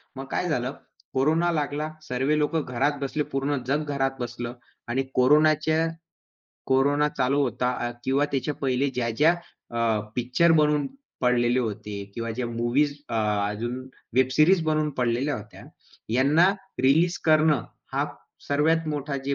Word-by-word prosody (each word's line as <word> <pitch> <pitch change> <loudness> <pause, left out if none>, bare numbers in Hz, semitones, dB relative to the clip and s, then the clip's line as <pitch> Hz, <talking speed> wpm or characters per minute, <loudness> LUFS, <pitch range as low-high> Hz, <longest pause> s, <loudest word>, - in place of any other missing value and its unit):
मग 135 +1 -6
काय 180 - 0
झालं, 130 -1 -1 0.4
कोरोना 160 +6 +2
लागला, 150 0 -2
सर्वे 135 +2 0
लोक 150 +2 0
घरात 140 +1 0
बसले 145 +2 -1
पूर्ण 140 +1 0
जग 145 +3 +1
घरात 135 -1 +1
बसलं 120 0 -5 0.3
आणि 130 +3 0
कोरोनाच्या 155 +4 +4 0.8
कोरोना 145 +3 +3
चालू 140 0 0
होता 125 0 0 0.2
आ - - -2
किंवा 135 +2 +2
त्याच्या 140 +2 -1
पहिले 135 +1 +1
ज्या-ज्या 125 +7 +2 0.4
अ, 115 -2 +1 0.2
पिक्चर 125 +8 +3
बनवून 150 -2 +3 0.3
पडलेले 125 0 +2
होते 105 -3 -4
किंवा 115 -1 -3
ज्या 120 +2 -3
मूव्हीज 120 +5 +1 0.2
अ, - - -4 0.3
अजून 120 +5 -4 0.3
वेब 130 0 +4
सीरीज 165 +5 +4
बनवून 155 -1 +1
पडलेल्या 125 +4 +1
होत्या, - - -11 0.5
यांना 145 +9 +4 0.3
रिलीज 160 +6 +3
करणं 155 -5 +4 0.3
हा - - +1 0.4
सर्वात 160 +3 +2
मोठा 145 -1 -2
जे 140 0 0
140 Hz, 140 wpm, -25 LUFS, 125-150 Hz, 0.8 s, कोरोनाच्या